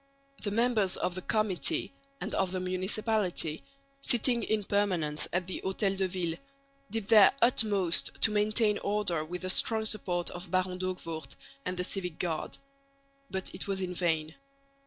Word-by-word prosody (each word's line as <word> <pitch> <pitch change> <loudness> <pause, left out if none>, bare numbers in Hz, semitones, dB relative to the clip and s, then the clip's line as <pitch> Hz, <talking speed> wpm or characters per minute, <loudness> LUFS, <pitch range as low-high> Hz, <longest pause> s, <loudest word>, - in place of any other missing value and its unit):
The 210 - -2
members 220 -3 +1
of 180 - -1
the 185 - -5
Committee 215 +4 +1 0.3
and - - -5
of 190 -2 0
the 185 - -2
Municipality, 185 -2 -1 0.4
sitting 240 -2 +2
in 215 -2 -1
permanence 180 -7 0
at 180 0 -1
the 185 - -5
Hotel 195 +1 0
de 190 0 0
Ville, 175 -3 -3 0.5
did 225 -3 -4
their 215 -4 +8
utmost 205 -7 +4
to 220 - +5
maintain 210 0 +2
order 200 -6 0
with 180 +3 -7
the 185 - -3
strong 220 +2 +3
support 180 -5 -1
of 175 +1 -8
Baron 185 0 -1
D'Hoogvoort 165 -5 -5 0.3
and 180 - -3
the 180 - -1
Civic 180 -3 -3
Guard. 165 -3 -3 0.7
But 190 -1 -5
it - - -5
was 195 -1 -2
in 185 -1 -3
vain. 160 -3 -1
185 Hz, 155 wpm, -30 LUFS, 180-210 Hz, 0.7 s, their